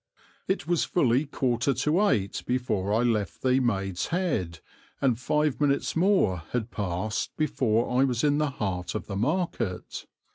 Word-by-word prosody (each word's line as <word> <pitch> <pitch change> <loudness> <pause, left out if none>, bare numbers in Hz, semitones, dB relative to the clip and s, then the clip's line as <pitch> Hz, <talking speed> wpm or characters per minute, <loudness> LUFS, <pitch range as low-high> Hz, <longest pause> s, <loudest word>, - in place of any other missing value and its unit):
It 190 - -1
was 170 0 +1
fully 135 -3 +2
quarter 130 -1 0
to 155 - +2
eight 100 - 0
before 115 -6 -1
I 115 +3 +2
left 110 -5 -1
the 130 0 +3
"Maid's 95 -7 -1
Head," 110 - -1 0.4
and 125 -4 +1
five 150 +2 0
minutes 140 -1 +1
more 165 - +3
had 120 -1 -2
passed 100 +2 -3
before 125 -4 +1
I - - +6
was 125 -3 0
in 145 0 +3
the 150 -1 +1
heart 95 -9 -3
of 110 - -3
the 100 - -5
market. 120 - -2
125 Hz, 155 wpm, -27 LUFS, 105-150 Hz, 0.4 s, I